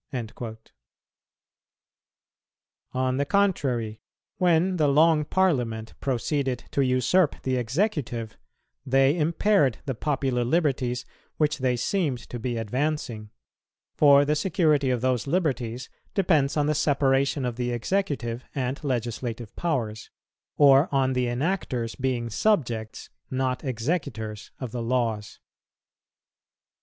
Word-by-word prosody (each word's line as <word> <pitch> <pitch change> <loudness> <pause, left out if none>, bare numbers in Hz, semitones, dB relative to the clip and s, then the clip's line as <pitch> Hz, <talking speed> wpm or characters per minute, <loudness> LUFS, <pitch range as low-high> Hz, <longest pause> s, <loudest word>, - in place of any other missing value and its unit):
"[202:2] 115 -2 -5 2.4
On 130 0 0
the 140 - +1
contrary, 135 - 0 0.4
when 180 +1 +3
the 155 -3 +3
Long 155 +2 +4
Parliament 125 -11 0
proceeded 135 0 -1
to 140 - +2
usurp 130 +6 +2
the 130 -1 0
executive, 125 - -1 0.5
they 135 +2 +3
impaired 165 - +2
the 135 - -2
popular 135 -1 -1
liberties 130 -3 0 0.3
which 150 -1 +1
they 130 -1 +1
seemed 150 - 0
to 120 - -4
be 120 0 -2
advancing; 120 -1 -2 0.6
for 145 -1 +6
the 150 +1 +1
security 155 -4 +2
of 125 -2 0
those 130 -1 0
liberties 130 -7 -1 0.3
depends 155 -7 +2
on 145 - +2
the 155 - +2
separation 140 -1 +1
of 120 -2 -2
the 125 0 -2
executive 120 - -2
and 130 +2 -2
legislative 120 -3 -3
powers, 115 -10 -2 0.5
or 140 +2 +6
on 135 -2 +2
the 125 -1 0
enactors 125 -3 -2
being 125 -3 0
subjects, 115 - -1 0.2
not 130 -1 -1
executors 115 - -3
of 130 -4 -5
the 120 - -4
laws. 115 -3 -1
130 Hz, 115 wpm, -26 LUFS, 120-150 Hz, 2.4 s, for